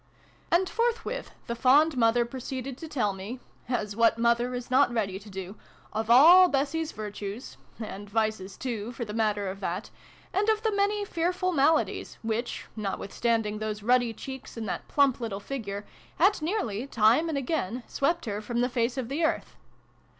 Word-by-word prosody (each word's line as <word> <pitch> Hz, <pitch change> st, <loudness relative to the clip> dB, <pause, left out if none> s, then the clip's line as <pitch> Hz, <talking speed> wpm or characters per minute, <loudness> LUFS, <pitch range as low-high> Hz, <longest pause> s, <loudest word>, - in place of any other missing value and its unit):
And 360 Hz, +2 st, +4 dB
forthwith 465 Hz, +2 st, -1 dB, 0.2 s
the 235 Hz, -, -3 dB
fond 280 Hz, +6 st, +4 dB
mother 235 Hz, 0 st, +3 dB
proceeded 260 Hz, +1 st, -5 dB
to 325 Hz, -, -7 dB
tell 230 Hz, -10 st, 0 dB
me 200 Hz, +7 st, -7 dB, 0.3 s
(as 210 Hz, -5 st, -1 dB
what 230 Hz, 0 st, +4 dB
mother 235 Hz, +1 st, +2 dB
is 245 Hz, +1 st, -6 dB
not 260 Hz, 0 st, +5 dB
ready 200 Hz, -5 st, -1 dB
to 210 Hz, +1 st, -13 dB
do 190 Hz, +1 st, -7 dB, 0.2 s
?) -, -, -26 dB
of 220 Hz, +1 st, -2 dB
all 335 Hz, +10 st, +9 dB
Bessie's 300 Hz, +2 st, -1 dB
virtues 210 Hz, +2 st, -6 dB, 0.2 s
(and 205 Hz, -2 st, -7 dB
vices 215 Hz, -3 st, -1 dB
too, 235 Hz, -3 st, -4 dB
for 235 Hz, 0 st, -4 dB
the 210 Hz, -, -7 dB
matter 210 Hz, -2 st, 0 dB
of 190 Hz, +1 st, -5 dB
that) 190 Hz, +2 st, -4 dB, 0.4 s
and 415 Hz, +3 st, +2 dB
of 435 Hz, 0 st, +2 dB
the 440 Hz, -, +2 dB
many 405 Hz, +1 st, +1 dB
fearful 360 Hz, +1 st, 0 dB
maladies 310 Hz, 0 st, +1 dB
which, 225 Hz, +2 st, -2 dB
notwithstanding 210 Hz, +1 st, -1 dB
those 215 Hz, -1 st, -4 dB
ruddy 245 Hz, 0 st, +3 dB
cheeks 265 Hz, +2 st, -8 dB
and 220 Hz, -1 st, -4 dB
that -, -, -4 dB
plump 280 Hz, -3 st, +3 dB
little 210 Hz, -4 st, -3 dB
figure, 205 Hz, -4 st, -5 dB, 0.3 s
had 380 Hz, +1 st, +4 dB
nearly, 295 Hz, -, -2 dB
time 235 Hz, +7 st, +3 dB
and 305 Hz, -, -1 dB
again, 255 Hz, -, -2 dB
swept 335 Hz, +3 st, 0 dB
her 210 Hz, -2 st, -3 dB
from 235 Hz, +2 st, -2 dB
the 250 Hz, -, +1 dB
face 245 Hz, 0 st, 0 dB
of 255 Hz, -3 st, -2 dB
the 285 Hz, +6 st, -2 dB
earth. 320 Hz, -, -1 dB
240 Hz, 175 wpm, -28 LUFS, 215-285 Hz, 0.4 s, all